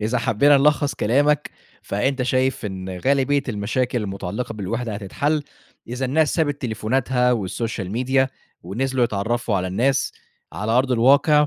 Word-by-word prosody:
إذا 115 Hz, +4 st, 0 dB
حبّينا 140 Hz, +5 st, +4 dB
نلخّص 145 Hz, -1 st, +2 dB
كلامك، 145 Hz, +7 st, +2 dB, 0.3 s
فأنت 130 Hz, +6 st, -1 dB
شايف 130 Hz, -1 st, 0 dB
إن 95 Hz, -2 st, -6 dB
غالبية 140 Hz, +3 st, +2 dB
المشاكل 115 Hz, +3 st, -1 dB
المتعلقة 100 Hz, +4 st, -4 dB
بالوِحدة 110 Hz, +2 st, -3 dB
هتتحل 145 Hz, +10 st, -1 dB, 0.5 s
إذا 125 Hz, +2 st, -3 dB
الناس 150 Hz, +4 st, +2 dB
سابت 145 Hz, -4 st, 0 dB
تليفوناتها 125 Hz, +2 st, +1 dB
والsocial 110 Hz, -1 st, -3 dB
media 130 Hz, +3 st, +1 dB, 0.3 s
ونزلوا 125 Hz, +7 st, 0 dB
يتعرّفوا 110 Hz, +1 st, -1 dB
على 95 Hz, -1 st, -1 dB
الناس 120 Hz, +9 st, 0 dB, 0.4 s
على 110 Hz, +1 st, -2 dB
أرض 130 Hz, +2 st, +2 dB
الواقع 140 Hz, +5 st, +5 dB
125 Hz, 130 wpm, -22 LUFS, 110-135 Hz, 0.5 s, الواقع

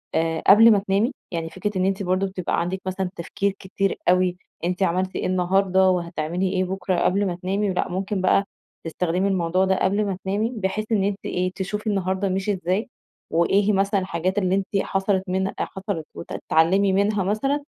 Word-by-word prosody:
آآ، 165 Hz, 0 st, 0 dB
قبل 225 Hz, +3 st, +8 dB
ما 210 Hz, -, +5 dB
تنامي. 200 Hz, +5 st, +1 dB, 0.2 s
يعني 165 Hz, -2 st, -3 dB
فكرة 190 Hz, +4 st, -3 dB
إن 185 Hz, -, +1 dB
أنتِ 195 Hz, +1 st, 0 dB
برضو 185 Hz, +1 st, +1 dB
بتبقى 185 Hz, -2 st, -2 dB
عندِك 185 Hz, +2 st, -3 dB
مثلًا 185 Hz, 0 st, -2 dB
تفكير 195 Hz, +4 st, -2 dB
كتير 195 Hz, +1 st, -2 dB
أوي، 180 Hz, 0 st, +3 dB, 0.3 s
أنتِ 180 Hz, +2 st, 0 dB
عملتِ 185 Hz, +1 st, 0 dB
إيه -, -, -2 dB
النهارده 185 Hz, +1 st, +3 dB
وهتعملي 175 Hz, 0 st, -1 dB
إيه 185 Hz, -1 st, +1 dB
بكرة 185 Hz, 0 st, -1 dB
قبل 200 Hz, +2 st, +2 dB
ما 175 Hz, -, -2 dB
تنامي، 195 Hz, +3 st, -1 dB
ولأ 180 Hz, -, -1 dB
ممكن 190 Hz, +2 st, -2 dB
بقى 190 Hz, +1 st, +3 dB, 0.4 s
تستخدمي 180 Hz, +3 st, -1 dB
الموضوع 185 Hz, -1 st, +1 dB
ده 190 Hz, 0 st, +2 dB
قبل 200 Hz, +3 st, +2 dB
ما 195 Hz, -2 st, -2 dB
تنامي 205 Hz, +4 st, 0 dB
بحيث 205 Hz, +1 st, -2 dB
إن 205 Hz, -3 st, +2 dB
أنتِ 200 Hz, 0 st, 0 dB
إيه، 180 Hz, 0 st, -1 dB
تشوفي 210 Hz, +3 st, -4 dB
النهارده 195 Hz, -1 st, 0 dB
مشي 190 Hz, +2 st, 0 dB
إزاي 185 Hz, +4 st, -1 dB, 0.4 s
وإيه 170 Hz, +5 st, +3 dB
هي 210 Hz, -, +2 dB
مثلًا 195 Hz, +1 st, +2 dB
الحاجات 185 Hz, +1 st, -2 dB
اللي 185 Hz, -2 st, +2 dB
أنت 195 Hz, -1 st, -1 dB, 0.2 s
حصلت 195 Hz, 0 st, 0 dB
منها 190 Hz, +1 st, -1 dB
حصلت، 190 Hz, -5 st, -4 dB
وتتعلمي 190 Hz, +5 st, +1 dB
منها 200 Hz, +1 st, +2 dB
مثلًا، 270 Hz, +10 st, 0 dB
190 Hz, 180 wpm, -23 LUFS, 180-200 Hz, 0.4 s, قبل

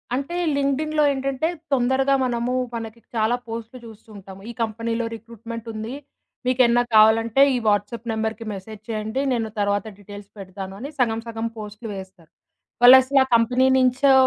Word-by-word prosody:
అంటే 280 Hz, +6 st, -4 dB, 0.2 s
లింక్డ్ఇన్‌లో 300 Hz, +2 st, 0 dB
ఏంటంటే 270 Hz, +2 st, -2 dB, 0.3 s
తొందరగా 265 Hz, +2 st, +2 dB
మనము 240 Hz, 0 st, -1 dB, 0.2 s
మనకి 230 Hz, 0 st, -7 dB, 0.2 s
చాలా 220 Hz, +2 st, +2 dB
పోస్టులు 230 Hz, +2 st, -7 dB
చూస్తూ 225 Hz, 0 st, -14 dB
ఉంటాము. 195 Hz, 0 st, -12 dB
ఈ -, -, -4 dB
కంపెనీలో 230 Hz, +1 st, -2 dB
రిక్రూట్‌మెంట్ 230 Hz, 0 st, -9 dB
ఉంది. 220 Hz, +3 st, -5 dB, 0.5 s
మీకేమన్నా 245 Hz, -1 st, +3 dB
కావాలంటే 225 Hz, +3 st, +5 dB
ఈ -, -, +1 dB
వాట్సాప్ 205 Hz, +3 st, 0 dB
నెంబర్‌కి 220 Hz, 0 st, -3 dB
మెసేజ్ 205 Hz, +2 st, -9 dB
చేయండి. 220 Hz, +3 st, -2 dB
నేను 225 Hz, -2 st, -2 dB
తర్వాత 205 Hz, 0 st, 0 dB
డీటెయిల్స్ 205 Hz, 0 st, -11 dB
పెడతాను 190 Hz, 0 st, -8 dB
అని 275 Hz, +5 st, -6 dB
సగం 225 Hz, -2 st, +1 dB
సగం 225 Hz, 0 st, -3 dB
పోస్టులు 210 Hz, +1 st, -8 dB
వేస్తారు. 190 Hz, -4 st, -12 dB, 0.5 s
వాళ్ళసల 260 Hz, +2 st, +8 dB
ఆ -, -, -4 dB
కంపెనీ 245 Hz, +3 st, +3 dB
నించో 260 Hz, +2 st, +3 dB
230 Hz, 145 wpm, -22 LUFS, 215-255 Hz, 0.5 s, వాళ్ళసల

